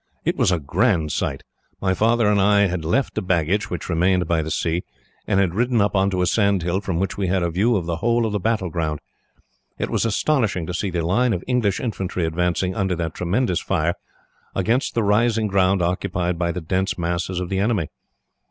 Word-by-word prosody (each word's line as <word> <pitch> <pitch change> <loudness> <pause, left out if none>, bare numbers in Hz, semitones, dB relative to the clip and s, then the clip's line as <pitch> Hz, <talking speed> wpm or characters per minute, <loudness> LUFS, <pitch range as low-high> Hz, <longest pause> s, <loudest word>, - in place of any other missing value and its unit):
"It - - +1
was - - +2
a 90 - +2
grand 80 - +1
sight. 70 0 -2 0.4
My 95 -1 +1
father 115 +3 +2
and 105 -1 +3
I 100 +1 +4
had 90 -4 0
left 125 - 0
the - - -2
baggage, 95 +5 0
which - - -5
remained 90 +2 +2
by 85 -1 +1
the 80 - -4
sea, 85 +2 -1 0.5
and 95 - +2
had 95 -4 +1
ridden 120 +3 +1
up 100 0 +1
on 95 0 +3
to 90 -2 0
a - - +2
sand 100 -3 +2
hill, 90 +3 0
from 95 -4 -2
which 95 +2 -2
we 95 - 0
had 90 0 +1
a 85 - 0
view 105 +8 +2
of 90 -5 -1
the 85 -1 -2
whole 115 +5 +1
of 110 - -1
the 105 - -1
battleground. 85 -8 -1 0.8
It - - -3
was - - +1
astonishing 115 - +1
to 90 - -5
see 95 +3 -2
the 85 -2 -2
line 115 +7 +2
of 90 - -3
English 120 -6 +1
infantry 95 -7 -2
advancing, 90 +3 0
under 95 -4 0
that 80 -1 -3
tremendous 90 +1 0
fire, 85 -2 0 0.6
against 115 +7 0
the 115 - +2
rising 110 +2 +2
ground 95 -2 +2
occupied 90 -1 -1
by 85 -1 0
the 90 +1 -4
dense 95 +4 -1
masses 85 +1 -2
of 90 -1 -4
the 95 - -1
enemy. 100 -7 0
95 Hz, 215 wpm, -22 LUFS, 85-105 Hz, 0.8 s, I